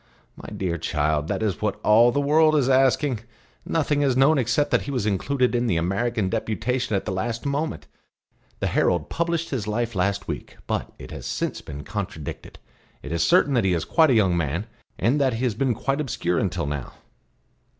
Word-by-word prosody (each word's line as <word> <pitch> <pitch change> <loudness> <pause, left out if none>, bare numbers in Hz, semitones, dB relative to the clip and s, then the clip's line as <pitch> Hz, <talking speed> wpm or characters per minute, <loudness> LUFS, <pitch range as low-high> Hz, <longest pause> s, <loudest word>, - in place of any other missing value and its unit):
"My - - -10
dear 85 -3 -3
child, 75 -1 0
that - - -2
is 100 -7 -1
what - - -1
all 115 +3 +6
the 140 - 0
world 155 +2 +4
is 140 -4 +2
asking. 135 -1 +3 0.5
Nothing 150 -2 +1
is 135 -3 +2
known 140 +3 +5
except 140 +5 +1
that - - +3
he - - -7
was 125 -6 -1
included 125 +6 +1
in 120 0 +1
the 90 - +1
American 95 +5 0
deputation 110 +3 -1
at 95 - -1
the 105 - -2
last 115 +7 -3
moment. 145 +3 -2 0.8
The - - +1
Herald 85 -4 +1
published 170 0 -1
his 115 -7 -2
life 115 +2 -1
last 100 +1 -1
week; - - -6
but - - -3
it - - -10
has - - -5 0.2
been 75 0 -8
contradicted. 100 -7 -6 0.5
It 70 - -7
is 85 0 0
certain 170 -5 +4
that 120 - +2
he 95 -2 +2
is 80 - -2
quite 160 -2 +4
a 130 - +4
young 95 -5 +3
man, 85 +4 -1 0.3
and 140 +6 +2
that 130 -3 +2
he 115 +3 -3
has 125 -4 +1
been 125 +2 0
quite 135 +5 -1
obscure 90 - -1
until 95 -6 -1
now." 70 -3 -4
115 Hz, 195 wpm, -24 LUFS, 95-135 Hz, 0.8 s, all